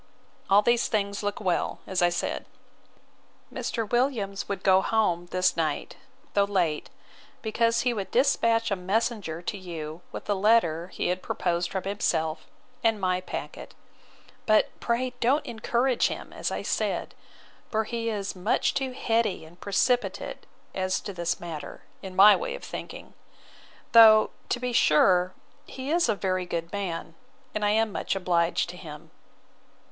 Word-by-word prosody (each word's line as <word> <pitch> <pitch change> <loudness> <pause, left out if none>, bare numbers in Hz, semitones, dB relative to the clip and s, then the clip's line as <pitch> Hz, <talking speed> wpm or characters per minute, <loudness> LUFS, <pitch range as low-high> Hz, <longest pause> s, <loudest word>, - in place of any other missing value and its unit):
All 200 +2 +6
these 235 +1 +3
things 200 -2 -1
look 205 -1 -2
well, 185 -5 0
as 190 -1 -1
I 175 - +5
said. 175 - -3 1.1
Mr. 225 -2 -3
Williams 225 -5 -1
would 200 - -3
go 190 -1 +5
home 180 -6 +1
this 185 +1 +1
night, 155 -3 -2 0.4
though 200 -1 +4
late, 180 -7 0 0.5
because 230 +1 +1
he 245 -1 +1
would 200 -4 -4
despatch 230 -4 +2
a - - +3
messenger 190 -3 -2
to 200 - -3
you 165 -3 -7
with - - -8
a 205 - +2
letter 190 -5 +2
he 185 - -3
had 180 +1 -1
proposed 175 0 -1
from 190 -2 -3
himself, 160 -5 -1 0.4
and 225 -2 +2
my 185 -1 0
packet. - - -7 0.7
But 215 -1 +4
pray 250 +2 -1
don't 265 +6 +2
encourage 240 +2 +1
him, - - -7
as - - -2
I - - -4
said; - - -1 0.6
for 220 -1 +1
he 230 +1 -3
is 200 -3 -3
much 185 +5 +1
too 265 -2 -2
heady 225 -8 0
and 175 +3 -17
precipitate 245 +5 0 0.3
as 185 0 0
to 200 - -6
this 170 -2 -2
matter, 165 -3 -7 0.2
in 190 -2 -8
my 205 +2 +9
way - - -3
of - - -10
thinking; - - -8 0.8
though, 220 -2 +8 0.2
to 245 - 0
be 250 0 -3
sure, 180 0 +4 0.3
he 265 +2 -5
is 340 -6 +2
a 220 - +2
very 185 -1 -1
good 170 0 -4
man, 170 -5 -4 0.4
and 215 - -2
I 205 - +3
am 220 +1 +2
much - - -2
obliged 175 -2 +1
to 180 - -12
him. 150 -4 -10
200 Hz, 155 wpm, -27 LUFS, 180-230 Hz, 1.1 s, my